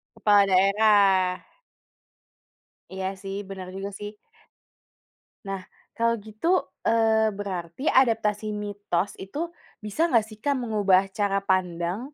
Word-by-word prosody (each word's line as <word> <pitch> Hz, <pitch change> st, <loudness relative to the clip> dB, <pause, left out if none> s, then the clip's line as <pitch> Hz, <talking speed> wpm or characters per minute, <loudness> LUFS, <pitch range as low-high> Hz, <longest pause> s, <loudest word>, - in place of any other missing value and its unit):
Kepala 205 Hz, -1 st, +4 dB
daerah. 195 Hz, -1 st, +3 dB, 1.4 s
Iya 190 Hz, 0 st, -4 dB, 0.2 s
sih, 195 Hz, 0 st, -5 dB
benar 190 Hz, -2 st, -7 dB
juga 195 Hz, +1 st, -4 dB
sih. 205 Hz, 0 st, -6 dB, 1.3 s
Nah, 195 Hz, -1 st, -3 dB, 0.3 s
kalau 230 Hz, 0 st, +2 dB
gitu, 215 Hz, +8 st, -5 dB, 0.4 s
eee, 220 Hz, -1 st, +3 dB
berarti 185 Hz, +1 st, -5 dB, 0.2 s
adaptasi 220 Hz, -4 st, +1 dB, 0.2 s
mitos 205 Hz, -2 st, -2 dB
itu, 195 Hz, +9 st, -9 dB, 0.5 s
bisa 210 Hz, +10 st, -3 dB
nggak 230 Hz, -8 st, +3 dB
sih 215 Hz, -1 st, -12 dB
Kak, 285 Hz, -1 st, +1 dB
mengubah 205 Hz, -5 st, +3 dB, 0.2 s
cara 200 Hz, -1 st, +2 dB
pandang 180 Hz, 0 st, 0 dB
205 Hz, 110 wpm, -25 LUFS, 190-220 Hz, 1.4 s, Kepala